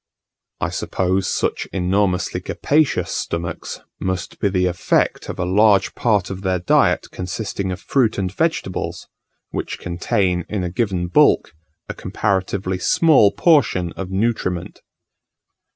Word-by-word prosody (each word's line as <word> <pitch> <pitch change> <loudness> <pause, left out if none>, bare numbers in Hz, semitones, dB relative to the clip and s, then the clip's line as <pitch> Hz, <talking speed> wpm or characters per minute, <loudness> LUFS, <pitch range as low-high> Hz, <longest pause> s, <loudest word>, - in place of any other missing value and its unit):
I - - -1
suppose 95 +1 -1
such - - -1
enormously 90 0 0
capacious 150 +9 +1
stomachs 85 -1 -4 0.2
must 95 -2 -3
be 100 - +1
the 90 -1 +1
effect 90 -1 0
of - - -5
a 90 - -1
large 100 +2 +3
part 105 -6 +1
of 95 0 -6
their 95 -1 0
diet 90 - +2
consisting 95 +1 -4
of 90 - -5
fruit 120 +1 +1
and 95 -1 -2
vegetables, 160 - -2 0.4
which - - -4
contain, 90 +1 -1
in 105 -3 -2
a 90 - -3
given 95 -4 -1
bulk, 90 - +3 0.3
a - - -4
comparatively 95 -1 -2
small 140 - +4
portion 130 - +2
of 95 +1 -6
nutriment. 95 -3 -2
95 Hz, 130 wpm, -20 LUFS, 90-105 Hz, 0.4 s, small